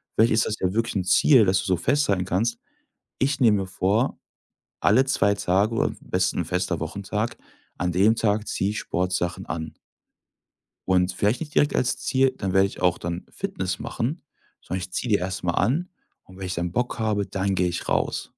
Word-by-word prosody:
vielleicht 115 Hz, +2 st, +4 dB
ist 110 Hz, -, +3 dB
das 105 Hz, -, -1 dB
ja 90 Hz, 0 st, 0 dB
wirklich 115 Hz, 0 st, -1 dB
'n 95 Hz, -, 0 dB
Ziel, 130 Hz, +3 st, +6 dB
dass 95 Hz, 0 st, +3 dB
du 90 Hz, -, -4 dB
so 95 Hz, -, +2 dB
festhalten 100 Hz, -, +1 dB
kannst: 110 Hz, +6 st, 0 dB, 0.6 s
„Ich 135 Hz, +1 st, +1 dB
nehme 110 Hz, -5 st, +5 dB
mir -, -, -5 dB
vor, 100 Hz, +7 st, 0 dB, 0.6 s
alle 130 Hz, -, +4 dB
2 100 Hz, -6 st, +2 dB
Tage 100 Hz, +4 st, +1 dB
oder -, -, +2 dB
am -, -, -9 dB
besten 90 Hz, 0 st, 0 dB
'n -, -, -1 dB
fester 90 Hz, -1 st, -1 dB
Wochentag 100 Hz, +7 st, -3 dB, 0.4 s
an 90 Hz, 0 st, 0 dB
dem 105 Hz, +6 st, +4 dB
Tag 105 Hz, -1 st, 0 dB
ziehe 95 Hz, -, -1 dB
ich 105 Hz, -, -3 dB
Sportsachen 90 Hz, 0 st, -2 dB
an.“ 80 Hz, -1 st, -5 dB, 1.1 s
Und 90 Hz, -1 st, +2 dB
vielleicht 105 Hz, +6 st, +1 dB
nicht 150 Hz, -2 st, -6 dB
direkt 145 Hz, -, +3 dB
als 125 Hz, -, +1 dB
Ziel: 130 Hz, 0 st, +1 dB
„Dann 95 Hz, -2 st, -2 dB
werde 95 Hz, 0 st, +5 dB
ich -, -, -11 dB
auch 90 Hz, -1 st, +3 dB
dann 85 Hz, +1 st, -5 dB
Fitness -, -, -4 dB
machen”, 140 Hz, +9 st, -3 dB, 0.4 s
sondern: 95 Hz, -, -4 dB
„Ich 90 Hz, 0 st, -7 dB
ziehe 115 Hz, +6 st, -3 dB
die 100 Hz, -, +4 dB
erst 90 Hz, 0 st, -4 dB
mal 85 Hz, -, 0 dB
an 160 Hz, -, +1 dB, 0.3 s
und 95 Hz, 0 st, -16 dB
wenn 95 Hz, -, -6 dB
ich 90 Hz, -, -3 dB
dann 85 Hz, 0 st, -2 dB
Bock 120 Hz, +2 st, -2 dB
habe, 105 Hz, -2 st, 0 dB
dann 95 Hz, 0 st, -1 dB
gehe 90 Hz, -1 st, +2 dB
ich 85 Hz, -, -4 dB
raus.“ -, -, -1 dB
95 Hz, 200 wpm, -24 LUFS, 90-115 Hz, 1.1 s, Ziel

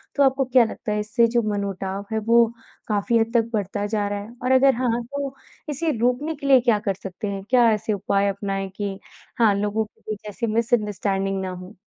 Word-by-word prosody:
तो 285 Hz, -, +4 dB
आपको 270 Hz, 0 st, +3 dB
क्या 250 Hz, -1 st, +5 dB
लगता 220 Hz, -, -5 dB
है 210 Hz, -, 0 dB
इससे 215 Hz, +2 st, +2 dB
जो -, -, +5 dB
मनमुटाव 195 Hz, -1 st, -3 dB
है 220 Hz, -, 0 dB
वो 235 Hz, 0 st, +6 dB, 0.4 s
काफ़ी 215 Hz, +2 st, +1 dB
हद 225 Hz, 0 st, 0 dB
तक 230 Hz, -1 st, +2 dB
बढ़ता 205 Hz, -1 st, -1 dB
जा 205 Hz, -1 st, -1 dB
रहा 205 Hz, 0 st, -2 dB
है? 205 Hz, +3 st, -9 dB
और 255 Hz, -, +1 dB
अगर 265 Hz, 0 st, +5 dB
हाँ, 240 Hz, -1 st, 0 dB
तो 275 Hz, +2 st, -5 dB, 0.3 s
इसे 310 Hz, +3 st, -1 dB
रोकने 250 Hz, +7 st, 0 dB
के 280 Hz, -1 st, -6 dB
लिए 270 Hz, -2 st, +7 dB
क्या 235 Hz, -3 st, +3 dB
कर -, -, +2 dB
सकते 195 Hz, +3 st, -5 dB
हैं? 195 Hz, -1 st, -4 dB
क्या 245 Hz, -2 st, +5 dB
ऐसे 215 Hz, +1 st, -1 dB
उपाय 200 Hz, 0 st, +1 dB
अपनाएँ 195 Hz, -1 st, -3 dB
कि 200 Hz, -2 st, -3 dB, 0.4 s
हाँ, 220 Hz, -3 st, +5 dB
लोगों 210 Hz, +2 st, 0 dB
के 210 Hz, -, -26 dB
लिए -, -, -1 dB
जैसी 220 Hz, +3 st, -3 dB
मिसअंडरस्टैंडिंग 205 Hz, -4 st, 0 dB
ना 190 Hz, -, -3 dB
हो। 185 Hz, +3 st, -9 dB
215 Hz, 210 wpm, -23 LUFS, 200-245 Hz, 0.4 s, लिए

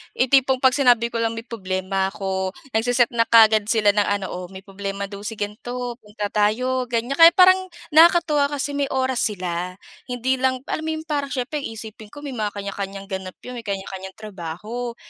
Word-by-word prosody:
Yung 255 Hz, 0 st, +1 dB
tipong 265 Hz, -1 st, +3 dB
'pag 260 Hz, -, +6 dB
sinabi 245 Hz, -4 st, +3 dB
ko 230 Hz, -, -2 dB
lang 230 Hz, 0 st, 0 dB
may 225 Hz, -, -6 dB
problema 190 Hz, -4 st, -2 dB
ako, 190 Hz, -1 st, -3 dB, 0.2 s
nagse-set 240 Hz, +2 st, +2 dB
na 230 Hz, -1 st, +1 dB
kaagad 220 Hz, -2 st, +6 dB
sila 215 Hz, -2 st, +4 dB
ng 205 Hz, 0 st, +1 dB
ano, 200 Hz, -1 st, -4 dB
"Oh 180 Hz, 0 st, -6 dB
may 190 Hz, +1 st, -11 dB
problema 195 Hz, 0 st, -5 dB
daw 200 Hz, 0 st, -7 dB
si 225 Hz, -, -5 dB
ganto, 245 Hz, +4 st, -5 dB
punta 210 Hz, -1 st, -6 dB
tayo," 250 Hz, +5 st, +1 dB
ganyan. 245 Hz, +4 st, -2 dB
Kaya 330 Hz, +1 st, +9 dB
parang 370 Hz, 0 st, +7 dB, 0.3 s
nakakatuwa 320 Hz, -2 st, +5 dB
kasi 285 Hz, 0 st, -3 dB
may 285 Hz, -1 st, -1 dB
oras 260 Hz, -2 st, -1 dB
sila. 180 Hz, -3 st, -4 dB, 0.3 s
Hindi 255 Hz, +1 st, -1 dB
lang 260 Hz, 0 st, 0 dB
alam 315 Hz, -, -3 dB
mo -, -, 0 dB
'yong 315 Hz, -, -6 dB
parang 290 Hz, -3 st, -2 dB
syempre 275 Hz, +2 st, -3 dB
iisipin 220 Hz, -4 st, -8 dB
ko 290 Hz, +7 st, -12 dB
may 285 Hz, -, -5 dB
mga 215 Hz, -5 st, -3 dB
kanya-kanyang 195 Hz, 0 st, -6 dB
ganap 190 Hz, -1 st, -5 dB
'yon, 250 Hz, -1 st, -7 dB
may 225 Hz, -, -12 dB
kanya-kanyang 190 Hz, -1 st, -5 dB
trabaho, 215 Hz, +4 st, -6 dB
230 Hz, 190 wpm, -22 LUFS, 200-260 Hz, 0.3 s, Kaya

